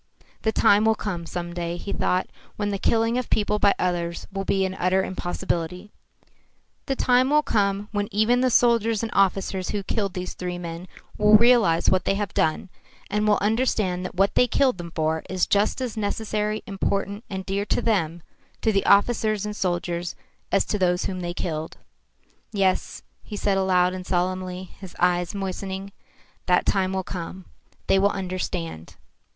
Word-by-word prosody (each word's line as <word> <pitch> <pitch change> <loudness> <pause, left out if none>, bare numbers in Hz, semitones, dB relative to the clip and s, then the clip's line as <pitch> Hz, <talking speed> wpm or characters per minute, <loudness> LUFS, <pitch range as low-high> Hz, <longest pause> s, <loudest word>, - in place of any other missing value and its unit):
"The 220 - +1
time 210 0 +4
will 220 0 +4
come 175 -6 -4
some 175 0 -5
day," 170 0 -3
he 200 - -5
thought, 185 0 +1 0.3
"when 205 -1 -2
the 200 -1 -2
killing 230 +3 +2
of 255 - -5
people 210 0 +1
by 200 - +4
others 170 -1 -2
will 195 0 -2
be 195 0 +1
an 190 - -3
utter 185 +2 +2
impossibility. 180 +1 -3 1.0
The 270 - 0
time 255 0 +3
will 300 +1 +4
come 200 -3 0
when 205 -1 -1
even 220 +4 +3
the 255 - +3
soldiers 230 -2 +3
and 225 - -3
officers 190 -1 +1
who 205 -1 -2
killed 200 -1 -2
these 180 0 -4
three 180 -1 -4
men 170 +1 -7 0.3
will 210 0 +7
realise 225 -8 +4
what 185 - +3
they 195 - +2
have 200 -1 -3
done 160 +4 0 0.4
and 210 +1 +1
will 210 - +4
understand 210 -4 +1
that 185 - -6
what 195 +2 +2
they 250 - +4
killed 255 -4 +2
them 170 -1 -6
for 160 0 0
is 185 -1 +1
just 205 +4 +1
as 250 -4 -3
necessary, 215 0 -2
important, 200 +1 -2
and 190 -1 -5
dear 195 +1 -1
to - - 0
them 175 -7 0 0.4
to 225 - +3
the 195 -2 0
officers 215 0 +3
and 210 0 -4
soldiers 175 -2 -2 0.4
as 195 - +3
to 210 - -2
those 180 -1 +1
whom 185 -1 -3
they 175 -1 -3
killed." 160 -3 -4 0.7
"Yes," 195 -3 0 0.2
he 210 - -8
said 200 -1 +1
aloud 185 -1 +2
and 185 0 -5
solemnly, 185 0 -2 0.2
his 190 -3 -10
eyes 180 +1 +1
moistening, 195 0 -4 0.6
"that 180 -1 +3
time 190 -1 +1
will 190 0 -1
come. 180 0 -7 0.4
They 195 - +3
will 200 +1 +4
understand." 180 - -4
195 Hz, 175 wpm, -24 LUFS, 180-210 Hz, 1.0 s, will